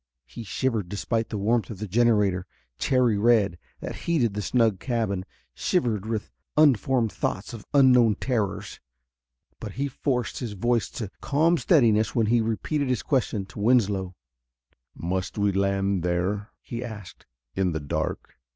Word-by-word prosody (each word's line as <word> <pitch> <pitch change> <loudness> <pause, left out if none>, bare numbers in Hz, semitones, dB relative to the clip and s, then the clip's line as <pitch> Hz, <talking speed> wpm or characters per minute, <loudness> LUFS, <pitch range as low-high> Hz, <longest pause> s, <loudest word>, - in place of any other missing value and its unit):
He 65 - -9
shivered, 110 -3 -1
despite 115 +3 -2
the 110 - -3
warmth 110 +1 +1
of 110 - -6
the 105 +2 -5
generator, 105 -4 +2 0.3
cherry 125 -6 +2
red, 105 -6 +3 0.2
that - - -5
heated 135 -11 +2
the 105 - -3
snug 110 -3 +2
cabin; 110 -7 -1 0.3
shivered 115 - 0
with 110 -2 -3 0.3
unformed 130 -5 +3
thoughts 100 +5 -3
of 110 -3 -9
unknown 125 -6 +5
terrors. 110 -7 -2 0.8
But 105 -3 -7
he 140 +3 -2
forced 125 -2 -2
his 120 -5 -4
voice 115 +1 0
to 105 -4 -5
calm 160 +4 +3
steadiness 110 - +3
when 115 -2 +3
he 115 +2 +3
repeated 130 +6 -1
his 120 -7 0
question 110 -6 0
to 95 - -11
Winslow. 100 -5 +2 0.8
"Must 95 +3 -3
we 100 -1 +2
land 100 -1 0
there?" 90 +4 -1
he 120 0 -6
asked. 105 -6 -9 0.3
"In 95 -2 0
the 80 - -2
dark?" 70 -3 -4
110 Hz, 150 wpm, -26 LUFS, 100-120 Hz, 0.8 s, unknown